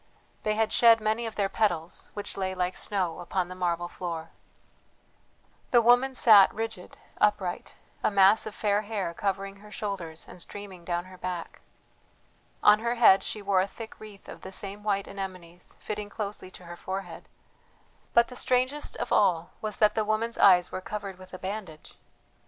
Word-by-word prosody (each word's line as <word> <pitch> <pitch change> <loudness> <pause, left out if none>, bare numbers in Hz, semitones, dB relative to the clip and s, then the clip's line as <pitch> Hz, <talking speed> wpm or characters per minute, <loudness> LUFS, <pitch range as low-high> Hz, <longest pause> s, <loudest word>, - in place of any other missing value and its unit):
They 215 0 0
had 220 0 +1
shed 230 -1 +6
many 220 +2 -1
of 220 - -7
their 200 -1 +1
petals, 175 -6 -1
which 205 - -5
lay 190 -1 -2
like 180 0 -1
snow 185 -5 -1
upon 180 +1 -2
the - - -6
marble 175 -1 -1
floor. 165 -2 -6 1.4
The 245 - +6
woman 245 +3 +4
sat 210 -6 +7
rigid, 225 -4 -6 0.2
upright, 190 -4 0 0.3
a - - +3
mass 200 +2 +5
of 215 - -7
fair 205 -1 +1
hair 205 -5 -3
covering 195 +1 -3
her 210 +1 -15
shoulders 195 -7 -5
and 180 - -10
streaming 195 -2 -8
down 175 0 -2
her 185 -1 -14
back. 180 -2 -5 1.0
On 210 0 +7
her 235 +2 -1
head 225 -5 +6
she 210 - -5
wore 195 -2 +3
a 190 - -1
thick 220 +2 -10
wreath 210 -2 -12
of - - -10
the 190 - -9
same 200 +1 -5
white 200 -2 -1
anemones 185 -3 -8
fitting 210 -1 -5
closely 205 -3 -6
to 185 -1 -13
her 175 0 -8
forehead; 190 +2 -6 0.9
but 235 0 +6
the 250 - -10
strangest 255 +4 +1
of - - -4
all 175 -4 +2
was 215 -2 -3
that 210 -1 +4
the 220 - 0
woman's 220 +2 -1
eyes 180 -3 +6
were 185 - -4
covered 195 -1 -6
with 185 0 -13
a 185 - -7
bandage. 190 -5 -7
200 Hz, 175 wpm, -28 LUFS, 185-215 Hz, 1.4 s, sat